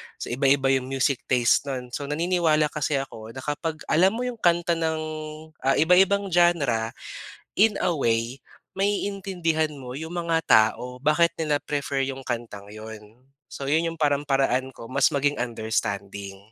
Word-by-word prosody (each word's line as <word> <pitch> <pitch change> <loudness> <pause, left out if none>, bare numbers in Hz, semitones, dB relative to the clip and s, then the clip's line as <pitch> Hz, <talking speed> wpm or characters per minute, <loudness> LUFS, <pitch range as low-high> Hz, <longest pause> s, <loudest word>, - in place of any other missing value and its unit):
So - - -6
iba-iba 135 +1 +3
'yong 130 -1 +1
music 135 -1 -1
taste 125 +2 +3
no'n. 125 -2 -5
So 140 +2 -4
naniniwala 155 -1 +1
kasi 150 -1 -1
ako, 115 -4 -5
na 130 - -7
kapag 155 +1 -3
alam 190 +6 +4
mo 245 - -2
'yong 245 -2 -4
kanta 175 -1 +2
ng 160 -1 0 0.7
ah, 135 - +4
iba-ibang 190 +3 +4
genre, 145 -11 +2 0.7
in 215 -1 +5
a 175 - +2
way 115 -2 0 0.4
ma-iintindihan 190 -6 -1
mo 130 -3 -9
yung 160 +2 -6
mga 165 -1 +1
tao. 125 +4 +3
Bakit 170 +3 +3
nila 150 -3 0
prefer 140 -2 -2
yung 135 0 -5
kantang 115 -5 -5
yun. 110 +3 -11 0.2
So 135 - -6
yun 165 +3 +1
yung 165 - -10
parang 145 -2 +2
paraan 135 -2 +1
ko 115 - -11
mas 135 +1 +2
maging 145 +1 +1
understanding. 100 -4 -3
140 Hz, 155 wpm, -25 LUFS, 125-165 Hz, 0.7 s, in